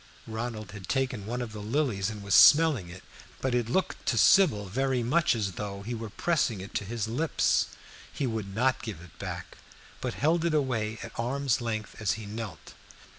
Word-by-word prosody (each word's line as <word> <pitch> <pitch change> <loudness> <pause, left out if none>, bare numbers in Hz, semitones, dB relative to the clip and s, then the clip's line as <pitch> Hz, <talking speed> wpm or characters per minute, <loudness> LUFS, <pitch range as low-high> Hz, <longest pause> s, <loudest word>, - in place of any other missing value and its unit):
Ronald 110 -3 -5
had 100 -2 -10
taken 130 -6 -1
one 125 +2 -2
of 115 - -7
the 110 - -7
lilies 110 -4 0
and 105 -2 -7
was 100 -1 -1
smelling 145 - +7
it, 90 +1 -11 0.4
but 130 -2 -1
it 120 -2 0
looked 190 +9 -1
to - - +2
Sybil 145 - +5
very 130 +5 0
much 155 +4 +3
as 105 -4 -1
though 100 0 -6
he 120 +4 -4
were 115 -1 -5
pressing 130 - 0
it 95 +2 -9
to 100 - -2
his 110 +1 -3
lips. 150 +8 +1 0.4
He 140 - -2
would 110 -5 -3
not 130 +3 +2
give 110 -8 -6
it 90 -2 -15
back, - - -6 0.4
but - - -3
held 160 +3 +2
it 170 -2 +1
away 115 -6 0
at - - -7
arm's 130 +1 0
length 110 -2 -4
as 105 -2 +2
he 110 -1 -7
knelt. 105 -5 -7
115 Hz, 195 wpm, -28 LUFS, 105-130 Hz, 0.4 s, smelling